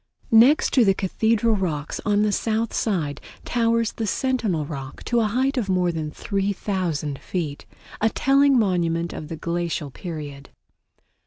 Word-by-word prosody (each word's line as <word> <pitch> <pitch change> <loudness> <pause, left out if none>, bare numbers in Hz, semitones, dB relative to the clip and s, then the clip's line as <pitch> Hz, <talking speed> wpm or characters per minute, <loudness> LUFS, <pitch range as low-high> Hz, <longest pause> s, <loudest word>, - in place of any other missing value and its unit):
Next 240 +7 +5
to 255 - +5
the 195 -3 +3
Cathedral 220 +4 +1
Rocks 155 -7 -3
on 205 0 +3
the 210 - +2
south 225 +2 -1
side 155 -10 -1 0.2
towers 230 -1 +1
the 225 - -4
Sentinel 215 - 0
Rock 135 -2 -7
to 240 - +1
a 225 - +2
height 260 +5 0
of 205 -5 -3
more 180 -2 +2
than 160 -2 -3
3000 185 -6 -2
feet, 155 -6 -4 0.3
a 220 - +4
telling 275 +2 +3
monument 170 -5 +1
of 150 - -7
the 165 0 -6
glacial 170 -3 -3
period. 145 -3 -7
195 Hz, 150 wpm, -23 LUFS, 160-225 Hz, 0.3 s, Next